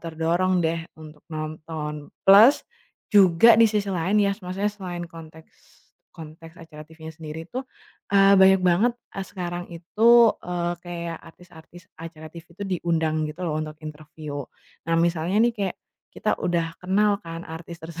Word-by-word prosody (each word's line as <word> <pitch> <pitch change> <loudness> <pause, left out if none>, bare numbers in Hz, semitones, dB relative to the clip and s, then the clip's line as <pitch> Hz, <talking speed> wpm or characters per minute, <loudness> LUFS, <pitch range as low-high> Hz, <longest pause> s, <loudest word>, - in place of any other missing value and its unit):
terdorong 170 +2 0
deh, 165 +1 0 0.2
untuk 155 -1 -13
nonton. 155 -1 -6 0.2
Plus, 210 +8 +7 0.5
juga 195 +2 +6
di 225 0 +5
sisi 210 -2 -1
lain 185 +4 0
ya, 200 -1 +2
s 205 - -22
maksudnya 195 +3 -3
selain 180 -4 -6
konteks 160 -1 -16 0.4
konteks 165 +1 -12
acara 160 -2 -13
TV-nya 160 +1 -11
sendiri 160 0 -8
tuh, 255 +9 -7 0.4
eee, 195 0 +5
banyak 190 0 +6
banget, 185 +7 +3
e 235 - -10
sekarang 175 -2 -6
itu, 220 +7 +4
eee, 175 0 -3
kayak 170 -2 -6
artis-artis 175 0 -16
acara 160 -1 -11
TV 170 -1 -11
tuh 200 - -5
diundang 165 -4 -1
gitu 165 +4 -7
lo, 165 - -2
untuk 155 0 -6
interviu. 150 -1 -8 0.5
Nah, 165 - +2
misalnya 170 +2 0
nih, 240 - +2
kayak 200 -4 -3 0.3
kita - - -2
udah 170 -2 -1
kenal 200 +2 +1
kan, 165 0 -8
artis 165 +1 -9
terse 165 0 -10
170 Hz, 155 wpm, -24 LUFS, 160-190 Hz, 0.5 s, Plus